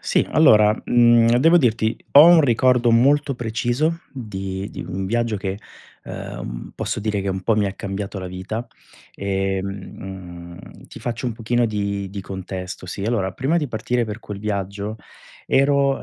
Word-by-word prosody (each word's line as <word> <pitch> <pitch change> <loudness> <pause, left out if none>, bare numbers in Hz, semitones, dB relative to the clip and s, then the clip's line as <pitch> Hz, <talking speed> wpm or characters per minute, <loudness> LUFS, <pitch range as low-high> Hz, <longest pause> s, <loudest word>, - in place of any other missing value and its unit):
Sì, - - +1
allora, 105 0 +5
mhmm, 120 -1 +5
devo 165 +6 +5
dirti, 115 -7 +2 0.2
ho 145 +3 +10
un 170 -2 +7
ricordo 125 -1 +3
molto 140 +4 +3
preciso 120 +7 -1
di 95 -5 -5
di - - -8
un 95 +1 -4
viaggio 115 +1 0
che, 95 0 -4 0.5
uhm, - - -7
posso - - -3
dire 105 -2 -1
che 100 - -3
un 95 - -3
po' 110 +3 +1
mi 105 - +2
ha 95 - -3
cambiato 100 0 -5
la 95 - -6
vita, 95 +6 -5 0.5
ehm, 95 -2 -5
ti - - -12
faccio 120 +1 -4
un 120 - -1
pochino 120 +2 0
di 100 -3 -2
di 100 0 -6
contesto, 95 -1 -7
sì. 95 +2 -6
Allora, 105 -5 0
prima 135 - 0
di 155 -4 0
partire 120 0 -1
per 105 -1 -6
quel 105 -3 -7
viaggio 100 0 -4 0.5
ero 140 0 +2
105 Hz, 160 wpm, -21 LUFS, 95-120 Hz, 0.5 s, ho